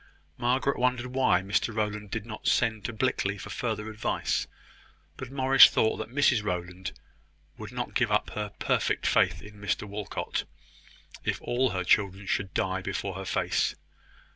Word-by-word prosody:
Margaret 130 +3 +1
wondered 125 0 +1
why 130 -9 +3
Mr 105 +3 0
Rowland 105 -1 -2
did 110 +1 -4
not 105 -2 -7
send 110 -3 +2
to - - -1
Blickley 110 -4 0
for 100 - -8
further 110 -1 -3
advice: 110 0 -1 0.7
but 130 - -7
Morris 135 0 +8
thought 110 - +2
that 110 0 -5
Mrs 125 -4 +3
Rowland 90 -1 -4 0.7
would - - -7
not - - -4
give - - +1
up - - +1
her 105 -1 -3
perfect - - 0
faith - - +2
in 105 0 -13
Mr 100 - -1
Walcot, 105 0 -3 0.8
if - - -1
all 130 +2 +1
her 95 -3 -2
children 100 +1 +2
should 95 0 -1
die 95 0 0
before 100 +1 -3
her 95 +1 -6
face. - - 0
105 Hz, 160 wpm, -28 LUFS, 100-120 Hz, 0.8 s, Morris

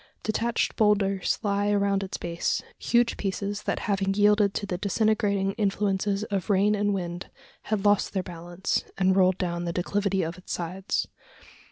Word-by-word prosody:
Detached 230 +2 0
boulders 200 -3 +2
lie 205 0 +1
around 200 -1 +2
its 195 0 -4
base, 170 0 -2 0.2
huge 240 0 +2
pieces 200 +1 -3
that - - -2
having 195 -1 0
yielded 205 -1 +4
to 205 - -2
the 185 - -3
disintegrating 200 -1 +1
influences 200 0 0
of 195 -1 -2
rain 200 +1 +4
and 205 0 +1
wind, 175 -1 -5 0.4
had 210 -2 -1
lost 205 -1 +3
their 190 -2 -1
balance, 175 +1 -3
and 190 -1 +3
rolled 185 -1 +4
down 175 -1 -2
the 170 - -1
declivity 195 +2 0
of 165 +2 -5
its 180 - -6
sides. 180 +3 -2
195 Hz, 160 wpm, -26 LUFS, 185-205 Hz, 0.4 s, yielded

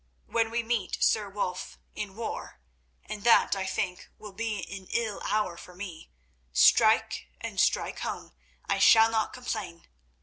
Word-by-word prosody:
When 230 -1 0
we 235 +1 -1
meet, 225 -5 -1
Sir 210 -2 +2
Wulf, 185 -2 -4 0.2
in 200 -2 -6
war—and 65 - -8
that, 235 -3 +5
I 190 -1 -3
think, 185 -1 -3
will 210 -2 -10
be 220 +1 -2 0.2
an 190 -1 -10
ill 225 -3 -2
hour 210 -5 0
for 180 +1 -12
me—strike, 60 - +1
and - - -5
strike - - +1
home; - - -5 0.3
I 195 - 0
shall 225 +3 +7
not 220 -1 0
complain. 215 -9 -5
200 Hz, 140 wpm, -28 LUFS, 175-220 Hz, 0.3 s, shall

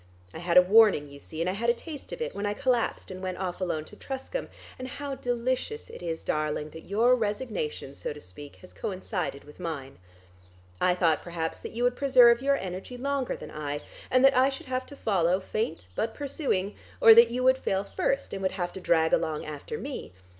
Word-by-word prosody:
I - - -7
had 175 0 +2
a 180 - +10
warning 200 -6 +5
you 140 0 -12
see, 155 +3 -7
and 170 - 0
I 185 - +1
had 230 +4 0
a 235 - +4
taste 300 +2 -9
of 475 - -3
it, - - -4
when 205 +1 -2
I 205 - -1
collapsed 250 -6 0
and 185 0 -7
went 185 -1 -3
off 185 -1 -4
alone 160 -4 -1
to 210 - -13
Truscombe; 270 - -5 0.3
and 255 - -5
how 280 +2 -5
delicious 255 - -2
it - - -10
is, 165 -2 -4
darling, 150 0 -1
that 160 - -11
your 230 +6 +4
resignation, 210 - -3
so - - -5
to 150 - -8
speak, 140 +8 -11
has 185 - -14
coincided 185 -6 -4
with 150 +3 -15
mine. 145 - -5 0.8
I 180 -1 +4
thought 165 -4 +2
perhaps 170 -2 -4
that - - -8
you 235 +2 -2
would 245 0 +3
preserve 250 -3 +6
your 280 +1 +3
energy 190 +6 -6
longer 275 0 -1
than - - -9
I, 145 -1 -4 0.3
and 255 +1 +5
that 270 0 +6
I 260 +2 +5
should 270 - -7
have 255 -1 -3
to 285 - -11
follow, 185 -7 +2
faint 195 - -3
but 225 - -2
pursuing, 265 - -1 0.3
or 225 - +10
that 230 +1 +8
you 250 +2 -2
would 260 +1 +5
fail 195 0 0
first, - - -1
and 195 - -4
would 190 - 0
have 175 -2 -3
to 190 - -7
drag 160 -2 +3
along 155 -1 +1
after 155 - -6
me. 275 - -6
200 Hz, 220 wpm, -28 LUFS, 165-255 Hz, 0.8 s, a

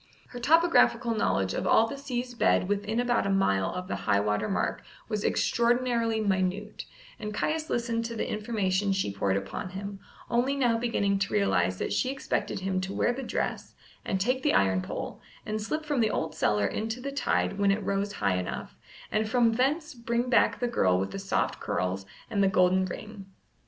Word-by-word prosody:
Her 245 - -8
topographical 265 -4 +4
knowledge 95 - 0
of - - -2
all 225 - +5
the 230 - -5
sea's 255 -3 -4
bed 230 - +2
within 205 +3 -1
about 245 -4 +1
a - - 0
mile 100 - +2
of 180 0 -5
the - - -2
high 100 0 +5
water 105 - 0
mark 195 - -1 0.3
was 210 -2 -2
extraordinarily 235 -1 +1
minute, 200 0 -1 0.3
and 210 - -4
Caius 315 +5 -1
listened 235 -1 -1
to 230 0 -4
the - - -2
information 205 -3 0
she 190 - -1
poured 100 -1 0
upon 100 - -5
him, 195 +1 -6 0.3
only 250 +4 +1
now 245 -4 +2
beginning 200 -4 +1
to 195 - -1
realize 95 - +2
that - - -2
she 255 - +1
expected 270 -7 -2
him 190 0 -1
to 190 +1 -4
wear 245 - +2
the 265 - -5
dress, 260 - -3 0.3
and 190 - -1
take 255 +6 +1
the - - +2
iron 95 -1 +3
pole, - - -6 0.2
and 215 0 -2
slip 310 +8 -3
from 295 -3 0
the 220 -2 +3
old 160 - -2
cellar 105 -1 +1
into 225 - -2
the 280 +2 -4
tide 275 -7 0
when 200 -1 +3
it 200 +1 +1
rose 200 +1 -1
high 100 -3 0
enough, 90 - -5 0.4
and 215 0 0
from 235 -1 +4
thence 290 +7 0
bring 235 +1 -2
back 235 - +4
the 245 - 0
girl 95 - +2
with 95 - -2
the 195 - -5
soft 195 0 -1
curls 95 +1 -2 0.2
and 200 - 0
the 195 - +5
golden 185 0 +3
ring. 200 +1 -8
210 Hz, 195 wpm, -28 LUFS, 185-240 Hz, 0.4 s, all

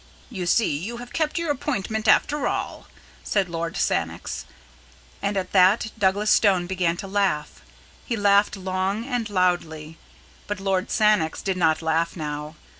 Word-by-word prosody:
"You 185 -6 -4
see 210 -5 +2
you 205 +11 -5
have 245 0 -10
kept 315 -1 -1
your 335 -3 0
appointment 220 -6 -2
after 290 +7 +3
all," - - -4 0.4
said 195 -3 0
Lord 170 +1 -4
Sannox. - - -2 0.8
And 200 0 -1
at 185 -1 -3
that 195 +3 +4
Douglas 205 0 +2
Stone 190 -4 +4
began 175 -2 0
to 195 - -6
laugh. 195 -7 -1 0.4
He 235 - -3
laughed 205 0 +3
long 190 +3 -2
and 245 -4 -2
loudly. 165 -5 -1 0.5
But 205 -2 -3
Lord 195 -1 -1
Sannox 210 -8 +2
did 190 -1 -1
not 165 -2 +2
laugh 160 +1 0
now. 150 -1 -5
190 Hz, 150 wpm, -24 LUFS, 175-215 Hz, 0.8 s, that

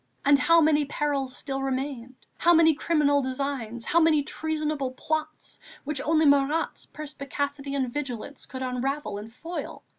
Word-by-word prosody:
And 285 0 +6
how 335 +2 +5
many 300 -1 +4
perils 280 -2 -2
still 270 -1 -4
remained, 265 -2 -3 0.2
how 345 0 +5
many 320 -1 +6
criminal 290 -2 +2
designs, 255 -3 -3
how 335 - +3
many 315 -3 +4
treasonable 305 -3 -2
plots, 310 +2 -4 0.2
which 285 -1 -2
only 315 +1 +3
Marat's 285 +3 +2
perspicacity 285 -1 -4
and 260 -3 -1
vigilance 275 -1 -5
could 260 0 -6
unravel 255 -2 -2
and 215 +2 -9
foil! 330 +9 -7
285 Hz, 145 wpm, -26 LUFS, 265-310 Hz, 0.2 s, And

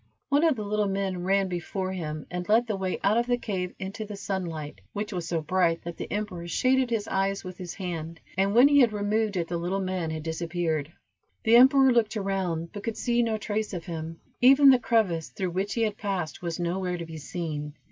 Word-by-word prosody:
One 285 +2 +3
of 320 -4 +4
the 215 - -4
little 210 0 0
men 195 -2 -2
ran 195 0 +2
before 185 +1 -3
him, 155 -5 -4
and 180 +2 -4
led 225 +3 +5
the 220 -3 -2
way 190 -1 -2
out 205 +3 +3
of 240 +1 +1
the 245 0 +2
cave 185 -6 -3
into 200 +4 -5
the 210 -1 -7
sunlight, 165 - -4
which 210 +1 -4
was 175 -3 -3
so 170 -1 -1
bright 170 0 +1
that 170 0 -6
the - - -6
emperor 200 -5 -3
shaded 255 +8 +2
his 225 -3 -1
eyes 195 +1 0
with 185 -1 -8
his 180 -2 -6
hand, 165 -3 -5 0.2
and 195 +3 +1
when 250 +4 +8
he 285 0 +5
had 240 -5 +5
removed 210 0 0
it 170 -2 -1
the 170 - -2
little 180 +3 -1
man 185 -3 -2
had 160 -1 -4
disappeared. 165 -2 -2 0.5
The 225 +1 +5
emperor 265 +2 +7
looked 225 -2 +2
around, 185 -5 -2
but 205 - -6
could 230 -2 -3
see 240 -1 +1
no 225 -2 0
trace 210 -1 -3
of 170 -2 -6
him; 165 -1 -6 0.2
even 270 +2 +8
the 255 - +5
crevice 205 -9 +1
through 185 -2 -3
which 190 +3 -2
he 230 - +1
had 215 -1 -1
passed, 190 -6 -3
was 170 -1 -3
nowhere 180 +1 -1
to 170 - -5
be 160 -1 -8
seen. 150 -2 -5
190 Hz, 225 wpm, -27 LUFS, 170-215 Hz, 0.5 s, when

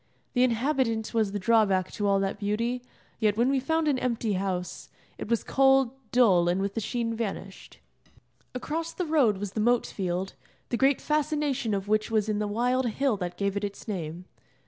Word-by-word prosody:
The 245 - +2
inhabitant 245 -2 +1
was 220 -3 +1
the 205 - -2
drawback 195 -3 +2
to 205 - -2
all 195 0 +3
that 195 0 -2
beauty, 230 +4 -1 0.4
yet 215 -2 +2
when 245 +3 +3
we 275 - +2
found 320 +4 0
an 275 -3 +2
empty 235 -4 -1
house, 185 -2 -3 0.3
it - - -6
was 235 -1 +1
cold, 270 -2 +4 0.2
dull, 190 -9 +4
and 180 +2 +1
with 200 0 -2
the 225 - -2
sheen 230 +1 -2
vanished. 195 -3 -6 0.8
Across 325 +6 -3
the 360 - -2
road 280 -10 +3
was 200 0 -4
the 215 - -4
moat 240 +2 +3
field, 185 0 -3 0.4
the - - 0
great 270 +2 +3
fascination 295 -6 0
of 195 0 -4
which 215 +1 +1
was 220 -2 +1
in 210 -1 0
the 210 - -1
wild 245 +4 +1
hill 260 +2 +1
that 175 -2 -5
gave 200 0 -1
it 200 - -2
its 200 +2 -5
name. 175 -3 -5
225 Hz, 190 wpm, -27 LUFS, 200-255 Hz, 0.8 s, cold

